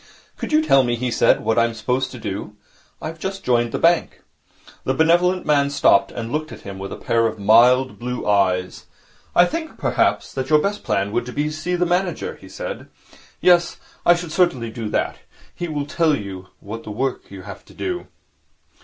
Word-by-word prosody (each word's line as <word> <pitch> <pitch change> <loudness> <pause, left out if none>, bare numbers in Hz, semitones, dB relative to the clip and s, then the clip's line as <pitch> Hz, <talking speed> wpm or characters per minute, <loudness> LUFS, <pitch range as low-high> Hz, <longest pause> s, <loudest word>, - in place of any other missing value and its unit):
'Could - - -6
you 310 +1 +4
tell 135 - +5
me,' 120 -2 0
he 125 +1 -2
said, - - +3
'what 115 +1 +1
I'm 115 0 +1
supposed 125 +4 -1
to 125 - -9
do? 105 -1 -5 0.4
I've 165 +1 -6
just 195 +2 -4
joined 120 -1 +1
the - - -2
bank.' 170 0 +1 0.6
The 130 - 0
benevolent 175 +4 +3
man 140 -2 +3
stopped, 100 -8 +3
and 115 -1 -5
looked 155 +1 -2
at - - -10
him 100 -1 -8
with 100 0 -6
a - - -4
pair 115 0 +1
of 110 0 -5
mild 120 +5 +4
blue 125 -1 -4
eyes. 95 -3 +1 0.5
'I 175 - +7
think, 320 - -5
perhaps, - - 0
that 130 0 -3
your 155 - +6
best 200 +6 -1
plan 100 +1 0
would 120 +2 -1
be 145 - +1
to 150 - -2
see 155 +4 -2
the 180 0 +1
manager,' 185 - -1
he - - -13
said. - - -6 0.5
'Yes, 175 -1 +4 0.3
I 175 - +6
should 170 -2 -6
certainly 135 -11 +1
do 110 -2 -5
that. - - -1 0.4
He 175 - -4
will 150 -3 -3
tell 160 0 +2
you 95 -5 -7
what 110 +3 -8
work 125 +5 -3
you 95 -1 -10
have 100 0 -10
to - - -18
do. 360 -1 -4
130 Hz, 195 wpm, -21 LUFS, 115-175 Hz, 0.6 s, I